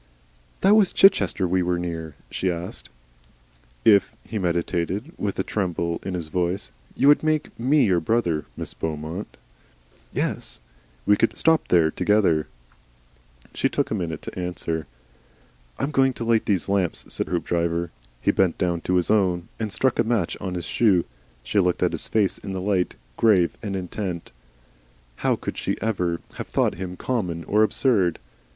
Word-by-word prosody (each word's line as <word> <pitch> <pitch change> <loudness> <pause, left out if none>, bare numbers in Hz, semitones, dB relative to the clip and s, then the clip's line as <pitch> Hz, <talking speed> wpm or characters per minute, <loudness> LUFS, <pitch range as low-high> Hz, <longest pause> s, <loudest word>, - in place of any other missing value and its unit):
"That 200 +2 +6
was 210 -4 +5
Chichester 105 - +4
we 90 +1 +2
were 90 0 0
near?" 80 -3 -4 0.2
she 95 - -1
asked. 85 +1 -6 1.0
"If," 100 -3 +5
he 110 - -4
meditated, 90 - -1
with 100 -2 -3
a 95 - +1
tremble 85 -5 -2
in 95 - -4
his 85 -3 -4
voice, 90 +1 -1 0.2
"you 135 - +3
would 145 - +7
make 155 -1 0
ME 135 +4 +4
your 90 -4 +3
brother, 85 -4 0
MISS - - -5
BEAUMONT." 80 +4 -5 0.7
"Yes?" - - -2 0.5
"We 105 - +5
could 115 - +1
stop 160 -1 +3
there 80 -3 +4
together 90 -5 +2 0.5
" - - -30
She - - +1
took - - -1
a - - +1
minute 80 -4 -3
to - - -7
answer. 85 -3 -3 0.9
"I - - -4
am 140 - 0
going 135 -2 +3
to 120 - -5
light 115 -1 +2
these 100 -4 +1
lamps," 95 -3 0
said - - -3
Hoopdriver. 85 -1 -1 0.3
He - - +3
bent 90 -3 +2
down 85 -2 0
to 90 - 0
his 90 +1 +2
own, 90 -5 +2
and 110 -2 -2
struck 130 +7 +1
a - - +5
match 110 -6 0
on 90 -1 -3
his 85 -2 -4
shoe. 95 0 +3 0.4
She - - +1
looked 90 -2 +2
at - - +2
his - - -4
face 105 -3 +1
in 95 -1 -5
its 95 - -4
light, 95 -3 +1 0.2
grave 100 -7 +4
and 100 -3 -3
intent. 90 -1 -4 0.9
How - - +1
could - - -5
she - - -2
ever 90 -6 -1 0.2
have - - -5
thought - - +1
him 90 0 -6
common 90 -10 -2
or 105 +5 +2
absurd? 110 - +2
90 Hz, 170 wpm, -24 LUFS, 85-105 Hz, 1.0 s, would